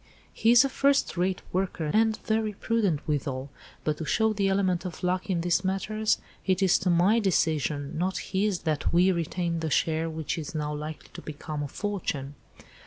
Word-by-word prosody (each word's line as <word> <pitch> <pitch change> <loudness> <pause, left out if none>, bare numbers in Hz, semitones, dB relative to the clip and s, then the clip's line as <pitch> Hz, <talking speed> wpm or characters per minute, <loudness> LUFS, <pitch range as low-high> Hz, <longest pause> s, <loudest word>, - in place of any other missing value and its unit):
"He 225 - +2
is 240 +3 +7
a - - +3
first 280 +1 +2
rate 185 +1 0
worker 180 -4 -1
and 220 0 +3
very 220 -1 0
prudent 200 -8 0
withal, 140 -2 -2 0.3
but 155 -1 0
to 160 - -3
show 220 +6 +2
the 200 -2 +1
element 190 -3 +1
of 180 -2 -7
luck 180 +2 0
in 175 -3 +1
these 175 +2 +1
matters 210 +3 0 0.3
it 190 0 +1
is 185 - +4
to 190 - 0
my 180 +6 +4
decision, 155 - 0
not 185 +2 0
his, 195 -1 -1
that 155 -2 -1
we 180 +3 +5
retained 170 -1 -2
the 160 - -1
share 160 +2 +1
which 160 0 -3
is 155 +1 -6
now 150 -1 -2
likely 150 +1 -6
to - - -8
become 150 0 -6
a 145 - -2
fortune." 150 -6 -3
180 Hz, 185 wpm, -27 LUFS, 155-200 Hz, 0.3 s, is